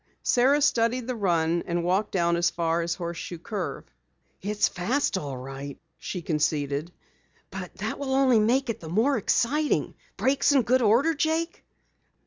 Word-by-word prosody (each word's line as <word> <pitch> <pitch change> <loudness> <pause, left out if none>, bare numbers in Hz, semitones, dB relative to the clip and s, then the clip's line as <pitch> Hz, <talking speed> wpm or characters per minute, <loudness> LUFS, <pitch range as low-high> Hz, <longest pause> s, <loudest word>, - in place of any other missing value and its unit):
Sara 275 +4 +3
studied 245 -3 +2
the 255 0 -3
run, 170 -5 +1
and 170 0 -1
walked 190 +4 0
down 170 -2 +2
as 170 0 +2
far 165 0 0
as 170 0 -2
Horseshoe 170 0 -5
Curve. 195 +1 -5 0.6
"It's 210 +2 +1
fast 235 +11 -1
all 145 -7 -4
right," 135 +2 -7 0.2
she 180 -3 -5
conceded. 150 -1 -1 0.6
"But - - -7
that - - -4
will 265 -2 -1
only 260 -4 +4
make 240 +4 +2
it 225 - -8
the 160 - -9
more 230 - +2
exciting. 290 +6 +1 0.2
Brakes 280 +2 +2
in 270 -3 +4
good 255 +2 +2
order, 240 +9 +4
Jake?" 320 +2 -1
205 Hz, 155 wpm, -26 LUFS, 170-260 Hz, 0.6 s, only